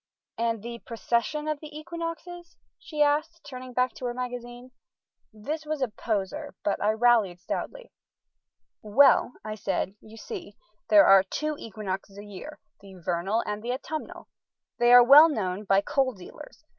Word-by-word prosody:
"And 230 -2 -1
the 235 0 -7
precession 235 +6 -2
of 305 -1 -2
the 305 0 -10
equinoxes?" 335 +2 -7 0.2
she 305 -3 0
asked, 310 +3 0
turning 255 -2 -8
back 250 +1 0
to 255 - -8
her 240 -1 -3
magazine. 245 0 -7 0.6
This 285 +9 -5
was 305 -1 -3
a 255 - -1
poser, 210 -3 -4
but 205 - -1
I 210 - +2
rallied 220 -6 +3
stoutly. - - -6 0.9
"Well," 250 +3 +4
I 215 - -4
said, 195 -2 -2
"you 220 +1 -14
see, 365 - -8 0.3
there 310 -1 +7
are 195 0 +8
two 305 +11 -3
equinoxes 200 -2 -6
a 205 - -9
year, 210 +10 -9 0.2
the 195 -1 -14
vernal 180 +5 -1
and 210 0 -4
the 240 +2 -2
autumnal. 305 +4 -6 0.5
They 240 0 +4
are 245 0 +10
well 290 +6 +9
known 200 - -3
by 195 0 +3
coal 260 +4 0
dealers. 295 +11 -13
245 Hz, 155 wpm, -27 LUFS, 210-300 Hz, 0.9 s, are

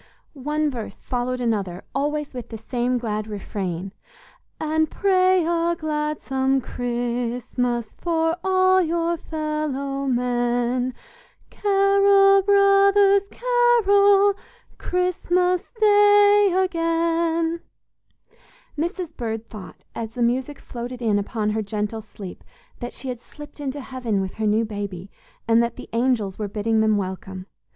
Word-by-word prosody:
One 300 +2 -1
verse 235 -4 -7
followed 250 0 -3
another 200 -7 -2
always 295 +1 -2
with 245 -2 -7
the 225 - -6
same 245 +3 -1
glad 215 -3 -3
refrain: 195 -3 -5 0.7
"And 315 0 0
pray 370 -3 +3
a 340 0 +1
gladsome 300 -4 -1
Christmas 240 -1 -2
For 325 -1 0
all 375 0 +4
your 340 0 0
fellow 305 -4 -3
men: 245 0 0 0.6
Carol, 395 0 +4
brothers, 395 0 +5
carol, 410 -5 +4 0.5
Christmas 360 0 0 0.2
Day 410 -1 +5
again." 335 -2 0 1.2
Mrs. 340 +1 -3
Bird 225 -1 -4
thought, 210 -4 -11
as 225 0 -6
the 245 - 0
music 255 +4 -1
floated 245 0 -7
in 210 -3 +2
upon 210 +1 -2
her 220 +1 -1
gentle 210 +1 -3
sleep, 200 -3 -10 0.4
that 240 - -6
she 265 - -7
had 245 -2 -4
slipped 295 +4 -13
into 285 0 -4
heaven 250 -6 -3
with 190 -1 -3
her 220 -1 0
new 220 +2 +2
baby, 200 -3 -6 0.4
and 230 0 +4
that 235 0 -1
the - - -10
angels 230 -5 0
were 210 - -2
bidding 220 +2 0
them 215 -1 +3
welcome. 190 -1 -5
270 Hz, 120 wpm, -23 LUFS, 230-350 Hz, 1.2 s, brothers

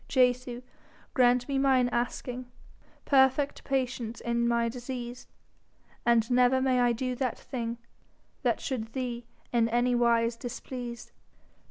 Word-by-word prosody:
Jesu, 250 -1 +1 0.5
grant 245 -1 +4
me 275 -1 0
mine 265 -2 +4
asking, 245 +1 -3 0.6
Perfect 270 +1 +3
patience 250 -4 -2
in 235 0 0
my 235 0 +2
disease, 245 0 -6 0.8
And 235 0 +3
never 250 +1 +4
may 260 -1 +2
I 245 -1 +4
do 255 +2 -2
that 255 -3 -1
thing 235 -3 -4 0.6
That - - +1
should 225 -4 -4
thee 245 -3 -4 0.3
in 230 -1 +3
any 240 +2 +2
wise 235 -1 +2
displease. 245 0 -7
245 Hz, 125 wpm, -29 LUFS, 235-255 Hz, 0.8 s, grant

